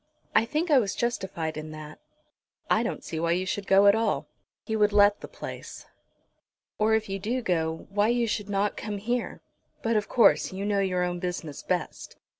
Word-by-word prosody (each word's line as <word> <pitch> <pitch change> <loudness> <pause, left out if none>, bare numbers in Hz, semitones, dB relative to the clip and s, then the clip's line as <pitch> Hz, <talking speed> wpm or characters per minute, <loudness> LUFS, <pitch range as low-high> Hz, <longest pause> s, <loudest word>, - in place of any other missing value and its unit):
I 220 - +4
think 310 +8 -1
I 280 - +7
was 205 -5 -1
justified 185 -9 -2
in 155 0 -6
that." 155 0 -10 0.7
"I - - +4
don't - - -3
see 160 - -5
why 170 +1 +1
you 185 +2 -1
should 195 +1 -3
go 195 +1 +6
at 200 - +8
all." 225 0 0 0.4
"He 220 - -2
would 210 -1 +3
let 205 0 +5
the - - -7
place." - - -8 0.9
"Or, 220 +1 +4
if 220 0 -1
you 195 0 -3
do 235 +6 -2
go, 165 -4 -1
why 205 +1 +2
you 240 0 +2
should 210 -2 -3
not 205 +1 0
come 205 -1 -4
here. 240 +4 -3 0.4
But, 230 0 +1
of 210 -1 0
course, 240 - +4
you 195 +2 -4
know 205 -1 +1
your 185 -2 +1
own 175 0 -2
business 175 -5 -4
best. - - -3
205 Hz, 200 wpm, -27 LUFS, 180-220 Hz, 0.9 s, at